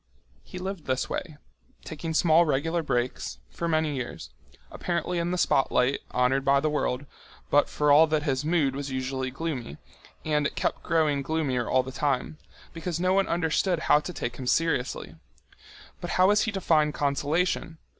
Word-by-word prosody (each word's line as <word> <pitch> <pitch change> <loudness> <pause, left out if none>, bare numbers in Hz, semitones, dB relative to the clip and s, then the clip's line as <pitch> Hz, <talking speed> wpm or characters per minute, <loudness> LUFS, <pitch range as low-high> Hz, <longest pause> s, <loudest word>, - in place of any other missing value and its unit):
He 185 - -10
lived 185 -2 -5
this 130 -1 -1
way, 155 -5 -4 0.5
taking 160 +1 -5
small 165 +1 +5
regular 165 +3 0
breaks, 120 - -2
for 170 - -3
many 155 -2 +1
years, 125 - -6 0.4
apparently 175 0 -2
in 170 +1 -1
the 180 - -1
spotlight, 135 -4 +2
honoured 125 +2 +2
by 140 0 +4
the 155 +2 0
world, 140 -2 -1 0.5
but 145 - +4
for 150 -1 +1
all 155 +3 +7
that 155 -1 0
his 135 -2 0
mood 150 -4 +1
was 140 0 -4
usually 130 0 -2
gloomy, 135 - -5 0.5
and 150 -2 +1
it - - -9
kept - - -1
growing 155 -4 +1
gloomier 135 -5 -1
all 130 0 +3
the 130 - -7
time, 140 +2 -1 0.3
because 165 0 -4
no 185 +1 +2
one 195 0 +2
understood 170 +2 +1
how 150 - +4
to 165 - -6
take 120 -7 -5
him 130 - -6
seriously. 165 -4 0 0.8
But - - -6
how 185 +1 +5
was 210 +1 +4
he - - -2
to 195 - -3
find 155 -3 +2
consolation? 155 +4 0
150 Hz, 175 wpm, -27 LUFS, 135-165 Hz, 0.8 s, all